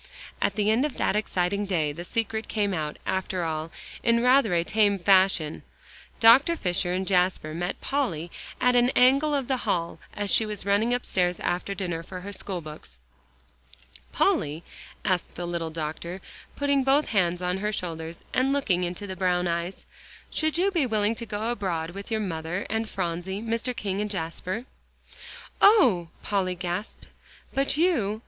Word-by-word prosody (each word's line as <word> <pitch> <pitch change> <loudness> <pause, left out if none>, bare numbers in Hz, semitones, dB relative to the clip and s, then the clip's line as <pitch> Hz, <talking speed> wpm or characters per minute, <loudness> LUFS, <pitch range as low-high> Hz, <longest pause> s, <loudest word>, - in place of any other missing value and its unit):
And - - +4
at - - -7
the 210 0 +2
end 230 +4 +3
of 300 -2 -2
that - - +1
exciting 200 -1 0
day, 160 -6 0
the 170 +4 -7
secret 225 +2 -2
came 205 -2 0
out, 155 -3 -3
after 190 -1 -1
all, 160 0 -3 0.3
in 235 0 +3
rather 250 -6 +4
a 170 - +2
tame 205 +1 +2
fashion. 185 -4 +3 0.6
Dr. 255 +9 +7
Fisher 180 - -1
and 185 +1 -1
Jasper 180 -4 +1
met 175 +3 -3
Polly 175 - -2 0.3
in 250 0 +3
an 245 0 +5
angle 275 +4 +5
of 270 -3 -1
the 265 - +1
hall, 175 -8 -2 0.2
as 205 -1 -2
she - - +4
was 210 -2 -4
running 205 +4 +2
upstairs 180 -8 0
after 185 +3 -1
dinner 175 -4 -3
for 180 +2 -8
her 200 +2 -7
schoolbooks. 155 - -7 1.1
"Polly," 150 +3 +1 0.4
asked 185 -3 0
the 175 - -4
little 170 -1 -3
doctor, 160 +3 -5 0.4
putting 280 -1 +2
both 275 +3 +3
hands 180 -4 +1
on 180 +1 -1
her 210 +2 -1
shoulders, 165 -4 -5
and 260 +1 +2
looking 210 -11 +1
into 180 +3 -4
the 190 -1 -6
brown 180 -1 +1
eyes, 170 +2 -3 0.5
"should 315 0 0
you 385 +3 +2
be 330 -8 +1
willing 215 -1 +1
to 230 0 -6
go 215 +2 -2
abroad 175 -7 -2
with 200 +2 -8
your 220 -1 0
mother 170 -1 -3
and 220 0 -1
Phronsie, 180 +1 -3
Mr. 230 +2 -2
King 200 -5 -2
and 210 - -2
Jasper?" 185 +4 -4 1.0
"Oh!" 250 - +6 0.2
Polly 190 -3 0
gasped. 180 +3 -4 0.5
"But 275 +1 +1
you?" 250 - +2
195 Hz, 170 wpm, -26 LUFS, 175-230 Hz, 1.1 s, Dr